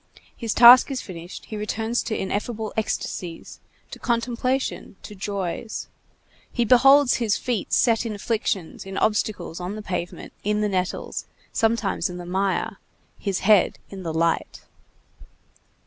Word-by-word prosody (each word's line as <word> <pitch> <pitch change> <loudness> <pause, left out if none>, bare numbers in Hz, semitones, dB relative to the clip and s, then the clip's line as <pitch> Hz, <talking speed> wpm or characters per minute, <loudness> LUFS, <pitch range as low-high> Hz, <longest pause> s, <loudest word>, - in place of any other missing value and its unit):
His 230 -3 -3
task 245 +3 +9
finished, 180 -9 -7
he 220 - -7
returns 220 +3 -1
to 220 - -3
ineffable 210 +3 -3
ecstasies, 180 -5 -4 0.3
to - - -8
contemplation, 245 +1 -1
to - - -9
joys; 200 +1 -4 0.6
he 240 - 0
beholds 270 +3 +6
his 225 -4 +1
feet 240 -6 -3
set 230 -2 +3
in 225 -3 -4
afflictions, 205 -5 -2
in 195 0 -7
obstacles, 210 -6 0
on 180 +3 -4
the 215 - -7
pavement, 180 -3 -5
in 210 +1 0
the 210 - +1
nettles, 185 -2 -2 0.3
sometimes 225 -4 +1
in 180 - -7
the 175 - -7
mire; 190 +2 -1 0.4
his 195 -3 -2
head 205 -2 +4
in 195 -1 -7
the 165 -3 -3
light. 165 +1 0
210 Hz, 135 wpm, -24 LUFS, 190-230 Hz, 0.6 s, task